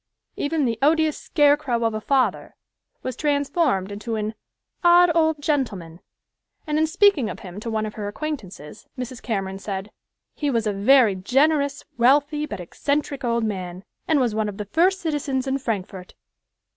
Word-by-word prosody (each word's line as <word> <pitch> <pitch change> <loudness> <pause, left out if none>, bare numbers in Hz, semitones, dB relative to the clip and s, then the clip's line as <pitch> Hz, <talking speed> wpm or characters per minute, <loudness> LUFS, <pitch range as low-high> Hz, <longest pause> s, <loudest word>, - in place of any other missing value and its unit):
Even 295 0 0
the 230 -2 -1
"odious 310 +1 +3
scarecrow 290 -5 +2
of 225 -1 +1
a 215 - -3
father" 265 +2 0 0.5
was 255 -2 -4
transformed 285 - 0
into 210 +3 -4
an 215 0 -2 0.5
"odd 350 0 +6
old 320 -2 +2
gentleman," 200 - -2 0.7
and 305 -1 0
in 315 - +3
speaking 355 - +3
of - - -7
him 185 +1 -8
to 230 - -5
one 220 -1 -1
of 215 - -6
her 210 -2 -5
acquaintances, 205 - -7
Mrs. 250 -1 -6
Cameron 195 -4 -3
said 195 0 -5 0.4
"he 290 - -2
was 230 -4 0
a 210 - 0
very 220 +2 +5
generous, 280 +8 +1
wealthy, 290 +4 +3
but 290 - -6
eccentric 280 - -2
old 235 -1 0
man, 185 -3 -4 0.2
and 310 -3 +3
was 245 -4 +1
one 215 -1 0
of 200 - -8
the 210 - -4
first 365 - +2
citizens 285 -5 -1
in 270 0 -1
Frankfort." 195 -6 -5
255 Hz, 165 wpm, -23 LUFS, 210-295 Hz, 0.7 s, odd